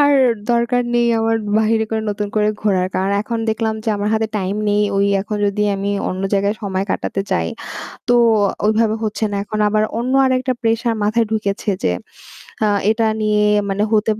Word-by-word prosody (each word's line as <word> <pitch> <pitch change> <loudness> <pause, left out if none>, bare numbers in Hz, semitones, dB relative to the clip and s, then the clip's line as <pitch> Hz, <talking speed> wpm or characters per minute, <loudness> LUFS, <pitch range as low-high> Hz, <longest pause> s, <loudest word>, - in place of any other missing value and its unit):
আর 290 0 +5 0.4
দরকার 235 +1 +1
নেই 240 0 +3
আমার 225 0 +1 0.2
বাহিরে 220 0 +2
করে 220 -1 -1
নতুন 205 0 -3
করে 210 0 +3
ঘোরার। 190 -3 +2
কারণ 190 +1 0
এখন 230 +2 -3
দেখলাম 220 0 0
যে - - -2
আমার 205 +1 -1
হাতে 220 0 +1
টাইম 190 0 -2
নেই। 205 0 +2
ওই 200 - +3
এখন 210 +2 -4
যদি 205 +1 0
আমি 195 +1 -2 0.2
অন্য 185 +1 -4
জায়গায় 200 +1 +1
সময় 190 -1 -1
কাটাতে 195 - -2
যাই 80 -1 0 0.6
তো 245 - +4 0.5
ওইভাবে 220 0 +2
হচ্ছে 215 +1 -2
না। 200 - -2
এখন 215 +1 -4
আবার 215 +1 +2 0.2
অন্য 245 +2 -1
আরেকটা 255 0 +1
প্রেশার 230 0 +1
মাথায় 220 +2 +2
ঢুকেছে 210 -1 -1
যে 90 - +2 0.7
আ - - +3 0.2
এটা 220 0 +1 0.2
নিয়ে 210 0 +2 0.2
মানে 195 +1 -1
হতে 220 0 +3
215 Hz, 180 wpm, -19 LUFS, 200-225 Hz, 0.7 s, আর